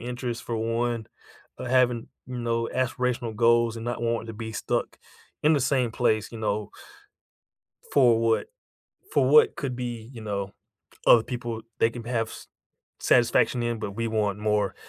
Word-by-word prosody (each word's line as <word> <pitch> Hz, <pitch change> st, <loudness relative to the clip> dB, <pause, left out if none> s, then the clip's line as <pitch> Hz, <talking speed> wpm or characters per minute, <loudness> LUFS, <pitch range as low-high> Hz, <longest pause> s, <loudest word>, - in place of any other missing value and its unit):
interest 120 Hz, 0 st, -4 dB
for 115 Hz, -, -3 dB
one, 115 Hz, 0 st, -1 dB, 0.5 s
uh, -, -, -5 dB
having, 125 Hz, -2 st, +2 dB, 0.2 s
you 125 Hz, -1 st, -5 dB
know, 115 Hz, -1 st, -1 dB
aspirational 125 Hz, -2 st, -1 dB
goals 115 Hz, 0 st, +4 dB
and 115 Hz, -, -6 dB
not 120 Hz, -1 st, -3 dB
wanting 115 Hz, -1 st, -1 dB
to -, -, -5 dB
be 110 Hz, 0 st, -6 dB
stuck -, -, -2 dB, 0.4 s
in 155 Hz, +2 st, +5 dB
the 145 Hz, -, +3 dB
same 125 Hz, -3 st, +1 dB
place, 110 Hz, -3 st, +1 dB
you 115 Hz, -, -7 dB
know 105 Hz, -1 st, -2 dB, 1.2 s
for 120 Hz, -5 st, +5 dB
what 115 Hz, -, +2 dB, 0.7 s
for -, -, +3 dB
what 455 Hz, -2 st, +6 dB
could 135 Hz, -6 st, -3 dB
be, 120 Hz, -1 st, -5 dB
you 115 Hz, -, -9 dB
know, 100 Hz, -2 st, -3 dB, 0.5 s
other 115 Hz, -, +8 dB
people 120 Hz, -2 st, -5 dB, 0.2 s
they 115 Hz, -, +3 dB
can 115 Hz, -1 st, -8 dB
have 115 Hz, -2 st, -1 dB
s -, -, -10 dB, 0.5 s
satisfaction 120 Hz, 0 st, +3 dB
in, 120 Hz, -1 st, -1 dB
but 105 Hz, -2 st, -4 dB
we 115 Hz, 0 st, -1 dB
want 105 Hz, -2 st, 0 dB
more 105 Hz, -1 st, 0 dB
115 Hz, 165 wpm, -26 LUFS, 110-125 Hz, 1.2 s, other